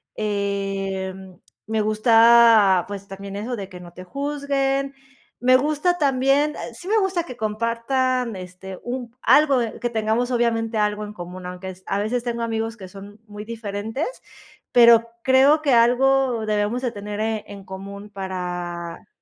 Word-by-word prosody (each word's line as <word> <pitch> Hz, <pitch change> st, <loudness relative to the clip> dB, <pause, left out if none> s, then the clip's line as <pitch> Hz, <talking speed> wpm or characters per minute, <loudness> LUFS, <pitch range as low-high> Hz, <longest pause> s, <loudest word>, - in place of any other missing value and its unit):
em, 195 Hz, -2 st, -3 dB, 0.3 s
me 220 Hz, 0 st, 0 dB
gusta, 225 Hz, -3 st, +5 dB
pues, 200 Hz, -1 st, -7 dB
también 195 Hz, 0 st, -8 dB
eso 235 Hz, +4 st, -3 dB
de 195 Hz, -3 st, -7 dB
que 180 Hz, -, -10 dB
no 175 Hz, -1 st, -12 dB
te 185 Hz, -, -10 dB
juzguen. 275 Hz, +3 st, -1 dB, 0.5 s
Me 255 Hz, +1 st, +5 dB
gusta 305 Hz, +6 st, 0 dB
también 275 Hz, +2 st, +2 dB, 0.2 s
sí 350 Hz, +10 st, -10 dB
me 440 Hz, -, +2 dB
gusta 385 Hz, -4 st, +1 dB
que 250 Hz, -7 st, -10 dB
compartan, 230 Hz, +2 st, -1 dB
este, 185 Hz, +1 st, -9 dB
un 245 Hz, -1 st, -5 dB
algo 285 Hz, -3 st, +5 dB, 0.2 s
que 240 Hz, -, -1 dB
tengamos 225 Hz, +3 st, 0 dB
obviamente 230 Hz, -2 st, 0 dB
algo 210 Hz, 0 st, 0 dB
en 210 Hz, -, -9 dB
común, 180 Hz, -1 st, -9 dB
aunque 180 Hz, +1 st, -7 dB
es 185 Hz, 0 st, -11 dB
a 200 Hz, -, -1 dB
veces 235 Hz, +3 st, -1 dB
tengo 235 Hz, -1 st, -3 dB
amigos 225 Hz, 0 st, -2 dB
que 190 Hz, -3 st, -9 dB
son 200 Hz, +2 st, -12 dB
muy 210 Hz, 0 st, -9 dB
diferentes, 225 Hz, +4 st, -4 dB, 0.6 s
pero 235 Hz, -1 st, +6 dB, 0.2 s
creo 270 Hz, +4 st, +5 dB
que 280 Hz, -4 st, +2 dB
algo 245 Hz, 0 st, +3 dB
debemos 210 Hz, +4 st, 0 dB
de 245 Hz, -3 st, -1 dB
tener 210 Hz, +1 st, -3 dB
en 200 Hz, -1 st, -10 dB
común 200 Hz, +2 st, -9 dB
para 180 Hz, -3 st, -5 dB
220 Hz, 150 wpm, -22 LUFS, 195-255 Hz, 0.6 s, pero